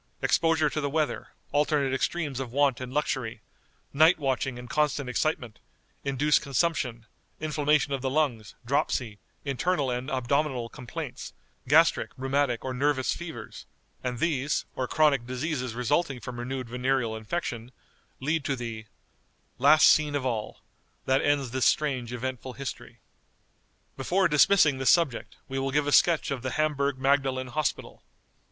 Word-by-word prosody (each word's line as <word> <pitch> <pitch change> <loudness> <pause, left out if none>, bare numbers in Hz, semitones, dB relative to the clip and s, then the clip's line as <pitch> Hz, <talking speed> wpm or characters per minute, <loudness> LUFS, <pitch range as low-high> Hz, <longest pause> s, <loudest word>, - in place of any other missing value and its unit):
Exposure 165 -2 +3
to 150 +1 -2
the 145 - -1
weather, 155 +1 -1 0.2
alternate 145 -2 +1
extremes 145 -1 -1
of 130 -3 -5
want 140 -1 +2
and 125 -1 -6
luxury, 130 -6 -2 0.5
night 160 +5 +5
watching 135 -3 -1
and 125 0 -9
constant 150 0 0
excitement, 125 -3 -2 0.4
induce 140 +2 +2
consumption, 135 -5 -1 0.3
inflammation 150 -2 +1
of 135 - -2
the 135 - -1
lungs, 130 -7 -1
dropsy, 120 -4 -1 0.3
internal 140 +1 0
and 125 +3 -3
abdominal 130 -1 0
complaints; 125 -3 -7 0.3
gastric, 160 +4 +4
rheumatic, 135 -2 0
or 130 - -2
nervous 130 0 +1
fevers; 170 -2 -8 0.4
and 125 -1 -2
these, 150 -1 0
or 130 - -2
chronic 140 -6 +2
diseases 130 -2 -3
resulting 135 +2 0
from 120 +1 -7
renewed 130 +1 -4
venereal 125 -1 0
infection, 115 0 -4 0.5
lead 155 +3 -1
to 140 - -1
the 115 -3 -6 0.7
"Last 145 +4 +7
scene 150 -1 +4
of 140 -2 -2
all, 110 -4 -3 0.4
That 130 0 +2
ends 145 -4 +1
this 130 0 0
strange, 130 -6 +1
eventful 130 +1 -5
history." 135 0 -8 0.9
Before 180 +8 +1
dismissing 150 -2 +4
this 135 - +2
subject, 165 -9 +2
we 135 0 -3
will 135 0 -1
give 145 +2 +1
a 145 - -1
sketch 165 0 +4
of 135 -3 -3
the 130 0 -3
HAMBURG 140 -3 0
MAGDALEN 135 -1 +1
HOSPITAL. 155 +5 -3
135 Hz, 145 wpm, -27 LUFS, 125-150 Hz, 0.9 s, Last